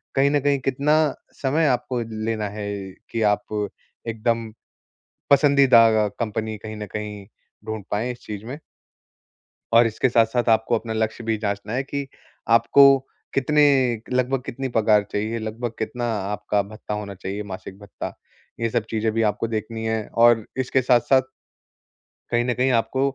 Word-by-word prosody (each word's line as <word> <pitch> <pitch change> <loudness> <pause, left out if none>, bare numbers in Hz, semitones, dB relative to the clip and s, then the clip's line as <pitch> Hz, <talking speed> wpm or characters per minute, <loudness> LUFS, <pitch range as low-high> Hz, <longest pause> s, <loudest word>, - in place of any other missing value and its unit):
कहीं 140 +1 +3
न 145 - +3
कहीं 140 0 +2
कितना 140 +4 +1 0.5
समय 145 +4 +2
आपको 125 -1 0 0.2
लेना 110 -2 -1
है 105 0 -6 0.4
कि 115 -1 -2
आप 105 0 -3 0.4
एकदम, 115 0 -1 0.8
पसंदीदा 125 -7 +5
कंपनी 110 -1 -3
कहीं 110 +1 -8
न 105 - -5
कहीं 105 -1 -5 0.4
ढूँढ 110 -2 -5
पाए 115 +4 -1
इस 120 - -10
चीज़ 105 0 -7
में। 135 +6 -7 1.1
और 115 0 +7
इसके 115 +3 0
साथ-साथ 115 +1 +2
आपको 110 +1 +1
अपना 110 0 -5
लक्ष्य 110 +1 -2
भी 110 -1 0
जाँचना 100 +1 -2
है 130 +2 0
कि 140 0 -4 0.5
आपको 115 +5 +5 0.5
कितने 150 +3 +2 0.3
एक 115 0 -9
लगभग 130 +1 +1
कितनी 135 +3 -4
पगार 105 -2 +4
चाहिए, 110 +3 -2
लगभग 115 +2 -4
कितना 120 +2 -3 0.3
आपका 105 0 0
भत्ता 105 0 -6
होना 105 -1 -5
चाहिए, 100 +2 -5
मासिक 95 +1 -9
भत्ता? 100 -2 -7 0.5
ये 115 0 0
सब 115 -1 0
चीज़े 110 0 0
भी 115 +1 0
आपको 105 +2 -3
देखनी 110 0 -4
है 110 0 0 0.2
और 115 -2 +5 0.2
इसके 130 +1 +1
साथ-साथ 130 +1 +4 1.1
कहीं 120 0 +2
न 125 - +1
कहीं 130 +2 +1
आपको 130 - -3
115 Hz, 155 wpm, -23 LUFS, 110-125 Hz, 1.1 s, और